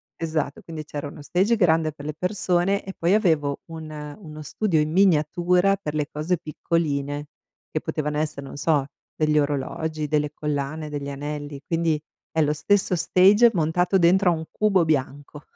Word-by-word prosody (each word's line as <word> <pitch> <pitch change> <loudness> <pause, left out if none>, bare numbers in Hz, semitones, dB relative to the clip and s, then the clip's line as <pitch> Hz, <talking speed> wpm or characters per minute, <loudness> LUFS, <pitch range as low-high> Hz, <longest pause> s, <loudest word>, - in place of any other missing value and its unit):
esatto, 155 -3 -3
quindi 160 -2 -7
c'era 145 -1 -5
uno 145 0 -10
stage 195 +9 +2
grande 165 -6 +3
per 145 -1 -11
le 150 - -3
persone 180 +2 0
e 190 - -6
poi 175 +5 +2
avevo 155 -9 +1
un 160 -1 -7 0.3
uno 155 -5 -10
studio 165 +2 0
in 150 0 0
miniatura 180 +1 +3
per 150 -3 -4
le 150 -1 0
cose 160 +4 -1
piccoline 145 -3 -2 0.5
che - - -2
potevano 150 0 -2
essere, 150 -3 -3
non 135 - -9
so, 145 -2 +2 0.3
degli 155 -1 +2
orologi, 150 +2 -2
delle 150 -1 0
collane, 150 +1 -3
degli 145 -1 -4
anelli, 145 0 -5
quindi 165 -2 0 0.3
è 160 - +1
lo 150 0 +1
stesso 190 +3 +1
stage 195 +7 +5
montato 175 +3 +2
dentro 185 +2 +4
a - - +3
un 160 0 -6
cubo 195 -5 +2
bianco. 145 -1 -2
155 Hz, 165 wpm, -24 LUFS, 150-175 Hz, 0.5 s, stage